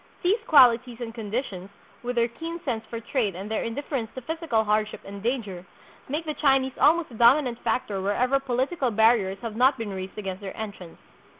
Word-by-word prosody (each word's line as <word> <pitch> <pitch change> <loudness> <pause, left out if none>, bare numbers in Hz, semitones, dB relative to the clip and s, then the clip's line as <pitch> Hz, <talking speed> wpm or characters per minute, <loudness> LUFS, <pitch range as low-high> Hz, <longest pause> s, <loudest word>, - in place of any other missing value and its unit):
These 390 +6 +3
qualities 245 -4 +5
and 230 -2 -5
conditions, 210 -4 -4 0.3
with 245 0 -3
their 235 -1 +3
keen 330 +8 -6
sense 230 -5 -2
for 230 - -4
trade 230 -4 -1
and 195 +4 -7
their 220 - 0
indifference 235 -1 -3
to 260 - -5
physical 320 -5 -1
hardship 215 0 0
and 200 0 -8
danger, 210 -6 -2 0.5
make 305 +4 -2
the 305 - -2
Chinese 270 -3 +2
almost 325 -2 +4
a - - -11
dominant 240 +2 +4
factor 200 -6 -1
wherever 250 +8 +1
political 265 +2 -1
barriers 220 -3 +3
have 225 -2 -4
not 260 +3 +4
been 225 -4 -4
raised 190 +1 -7
against 195 -2 -5
their 195 -1 -7
entrance. 200 -6 -7
235 Hz, 185 wpm, -26 LUFS, 210-265 Hz, 0.5 s, qualities